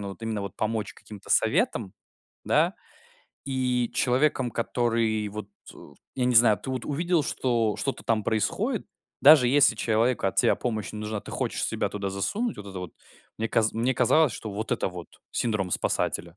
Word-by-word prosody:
но 100 - -5
вот 105 - -12
именно 110 -3 -3
вот 100 - -6
помочь 110 -1 -2
каким-то 105 -2 -12
советом, 95 - +1 0.5
да. - - +2 0.7
И 125 -3 0
человеком, 130 0 +1
который 115 -2 0
вот 105 0 -7 0.2
у 70 - -15 0.2
я 125 - 0
не 125 -1 +1
знаю, 110 -4 +6
ты 130 - -6
вот 130 -2 -4
увидел, 170 +2 0
что 120 -5 0
что-то 135 - -3
там 110 -3 0
происходит, 110 -2 -1 0.3
даже 145 -2 +8
если 140 +1 +5
человеку 115 0 +1
от 95 - -2
тебя - - +4
помощь 110 -4 -3
не 105 - -6
нужна, 105 -1 -4
ты - - -11
хочешь - - -2
себя - - -1
туда 100 -2 -4
засунуть, 200 - -2
вот 100 - -9
это 95 -1 -7
вот. 90 -2 -7 0.5
Мне 115 0 -1
каз 115 -2 +2
мне 120 +4 0
казалось, 155 -5 +3
что 110 - -6
вот 105 +2 -3
это - - 0
вот 90 -2 -9 0.2
"синдром 105 -6 -1
спасателя". 85 +1 -1
115 Hz, 180 wpm, -26 LUFS, 105-125 Hz, 0.7 s, даже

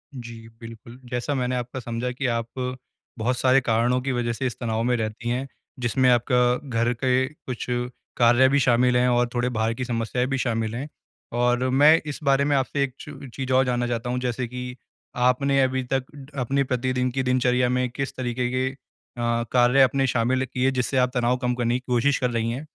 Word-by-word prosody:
जी। 115 -2 -9
बिल्कुल, 115 +1 -11
जैसा 125 +4 -2
मैंने 125 -1 -1
आपका 125 +1 -4
समझा 120 +1 -3
कि 130 +3 -4
आप 115 -1 -1 0.7
बहुत 120 +3 0
सारे 130 +2 +4
कारणों 120 +1 +1
की 135 +1 -2
वज़ह 120 -2 -1
से 130 - -4
इस 120 - -5
तनाव 115 -2 -1
में 125 +1 +2
रहती 110 +1 -3
हैं। 125 +3 -2 0.3
जिसमें 125 +2 +2
आपका 125 +1 +3 0.3
घर 120 0 +1
के 130 +1 +1
कुछ 130 -5 -7 0.5
कार्य 120 +2 +5
भी 140 +1 +3
शामिल 125 -1 +3
हैं 125 0 +3
और 120 0 +2
थोड़े 120 0 0
बाहर 115 -1 0
की 125 +2 -4
समस्याएँ 120 +1 -1
भी 135 0 -1
शामिल 115 -3 -1
हैं। 135 +5 -4 0.5
और 125 +1 +2
मैं 145 +5 +6
इस 150 -2 -5
बारे 140 -1 +3
में 145 0 +2
आपसे 140 +1 0
एक 135 -2 -3
च 135 - -10
चीज़ 135 -1 -4
और 130 +1 +4
जानना 120 -1 0
चाहता 120 0 -3
हूँ 125 +1 -1
जैसे 125 0 -2
कि 125 +1 -6 0.4
आप 125 - +1
आपने 140 +1 +1
अभी 130 0 +1
तक 135 -1 +1 0.4
अपने 135 +3 +1
प्रतिदिन 125 0 -1
की 130 +1 -1
दिनचर्या 125 -1 +2
में 125 0 0
किस 135 +3 -5
तरीके 125 -1 -2
के 130 +1 0
अ, 120 -3 -4
कार्य 125 +2 +4
आपने 135 +1 +3
शामिल 130 +2 +1
किए 130 +1 0
जिससे 130 +1 -1
आप 125 0 +3
तनाव 125 0 +1
कम 125 -1 -1
करने 120 -1 0
की - - -23
कोशिश 125 +3 +2
कर 125 - +1
रही 115 -1 -1
हैं? 130 +6 -5
125 Hz, 205 wpm, -24 LUFS, 120-130 Hz, 0.7 s, मैं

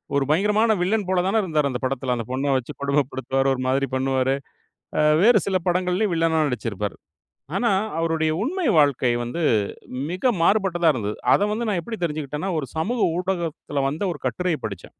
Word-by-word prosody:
ஒரு 140 - +3
பயங்கரமான 210 +6 +3
வில்லன் 205 0 0
போல 185 -1 +2
தானே 215 +3 +1
இருந்தார் 155 -5 +1
அந்த 125 - -3
படத்தில. 130 -1 -1
அந்த 115 - -4
பொண்ணை 135 +2 -1
வைச்சு 130 -2 -3
கொடுமைப்படுத்துவார். 135 -1 0
ஒரு 130 - -5
மாதிரி 135 +1 +1
பண்ணுவார். 130 0 +1 0.9
வேறு 225 -2 +6
சில 190 -1 +2
படங்களிலும் 180 +3 +1
வில்லனாக 160 -1 +2
நடிச்சிருப்பார். 105 -4 -3 0.6
ஆனா 235 0 +2 0.3
அவருடைய 160 -1 +1
உண்மை 355 +5 -2
வாழ்க்கை 140 -4 +3
வந்து 145 +9 -4 0.7
மிக 240 +8 +1
மாறுபட்டதா 180 -3 +2
இருந்தது. 105 -4 -3 0.2
அத - - +3
வந்து 225 +1 -2
நான் 195 -5 0
எப்படி 225 +5 -6
தெரிஞ்சுகிட்டேனா, 150 +1 -3
ஒரு 140 - -3
சமூக 225 +9 -1 0.2
ஊடகத்தில 170 -6 -2
வந்த 160 +8 -3
ஒரு 145 - -12
கட்டுரையைப் 160 -3 -2
படிச்சேன். 100 -4 -9
160 Hz, 160 wpm, -23 LUFS, 135-190 Hz, 0.9 s, வேறு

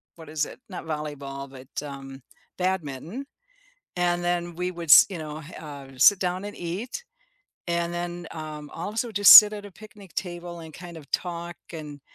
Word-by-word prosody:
what 160 -2 -12
is 155 -1 0
it? - - -11
Not 180 -3 -7
volleyball, 140 -3 -5
but, 130 -1 -12 0.2
um, 135 -1 -9 0.4
badminton, 180 - -3 0.7
and 175 0 +1
then 175 -1 -1
we 180 +1 -1
would, 170 -3 -6
s - - +10
you 190 - -6
know, 155 -1 -6 0.2
uh, 140 -3 -9
sit 195 +9 +7
down 185 +1 -2
and 205 - -6
eat, 200 - -5 0.7
and 170 0 -1
then, 175 0 -4
um, 155 -2 -7
also 215 +7 -3
just 205 -1 +9
sit 210 0 +12
at 205 -1 -7
a - - -11
picnic 205 -2 -14
table 175 -1 -5
and 160 -1 -11
kind 175 -1 -10
of 150 -4 -12
talk 175 -1 -3 0.2
and 150 -3 -8
170 Hz, 175 wpm, -26 LUFS, 150-180 Hz, 0.7 s, sit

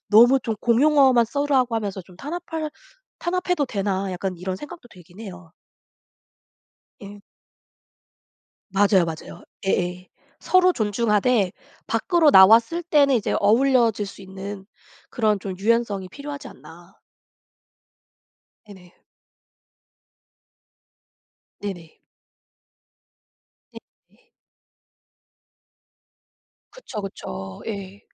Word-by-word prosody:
'너무 240 +5 +6
좀 225 -3 -3
공용어만 260 0 +4
쓰라고 265 -2 0
하면서 205 -3 -4
좀 180 0 -18
탄압할 320 - -5 0.5
탄압해도 360 -3 -1
되나?' 195 -3 -2
약간 185 0 -4
이런 185 +1 -4
생각도 295 - -11
들긴 180 0 -16
해요. 180 -6 -10 1.5
예. 200 0 -11 1.5
맞아요, 195 -1 +3
맞아요. 160 -1 -8 0.2
예예. 180 -1 -1 0.3
서로 365 0 +4
존중하되 210 - +1 0.3
밖으로 340 -5 +2
나왔을 230 - +6
때는 290 -5 +3
이제 225 -4 0
어우러질 230 -2 +3
수 195 0 -11
있는 190 +1 -8 0.4
그런 215 -4 +1
좀 190 -1 -6
유연성이 210 -3 0
필요하지 285 +5 -8
않나. 175 +3 -16 1.7
네네. 185 -4 -15 2.7
네네. 175 -6 -8 1.7
네네. - - -19 2.5
그쵸, 265 - -8
그쵸. 95 - -8
예. 200 -2 -7
210 Hz, 190 characters per minute, -23 LUFS, 190-270 Hz, 2.7 s, 너무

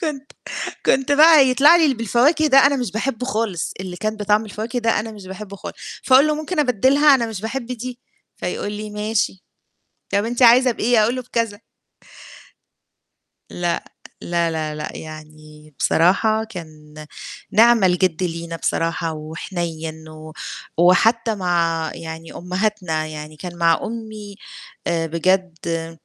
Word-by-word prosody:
كنت 295 -4 -4 0.5
كنت 270 +1 +2
بقى 300 -2 +7
يطلع 285 +6 +6
لي 340 - +4
اللي 280 -3 +2
بالفواكه 250 +8 +2
ده 275 -2 +6
أنا 280 0 +2
مش 245 -8 -3
باحبه 240 +2 -2
خالص 220 -8 -2
اللي 185 -2 -6
كان 215 +4 -3
بطعم 210 +1 +1
الفواكه 220 +4 -4
ده، 230 -1 +1
أنا 220 +1 -7
مش 205 -3 -12
باحبه 195 +1 -8
خالص. - - -9 0.3
فاقول 265 +3 +6
له: 305 - +1
"ممكن 310 +4 -5
أبدِّلها 275 +2 +4
أنا 240 -3 +1
مش 220 -4 -6
باحب 235 +3 -4
دي؟" 250 0 -6 0.4
فيقول 205 - -4
لي: 210 0 -6
"ماشي 210 -2 -2 0.7
طَب 200 +1 +2
أنت 240 +2 -2
عايزة 250 +2 +7
بإيه؟" 230 0 +2
أقول 235 +4 0
له 255 - -4
بكذا. 230 -4 -3 1.9
لأ، 175 -1 -2 0.4
لا، 170 -1 0
لا، 155 -1 -3
لأ، 150 0 -5
يعني 155 -1 -12
بصراحة 215 +6 +2
كان 155 -7 -11 0.6
نِعْمَ 230 0 +5
الجِد 180 -1 +2
لينا 170 -1 -4
بصراحة 165 0 -1
وحنيّن 160 0 -6
و 155 0 -11 0.4
وحتّى 220 +6 +3
مع 170 -4 0
يعني 160 0 -8
أمهاتنا، 180 -3 -2
يعني 155 0 -8
كان 175 +2 -8
مع 165 -1 +3
أمي 215 -3 -7 0.5
آآ 165 -1 0
بجد 165 -1 -1
205 Hz, 145 wpm, -20 LUFS, 165-235 Hz, 1.9 s, بقى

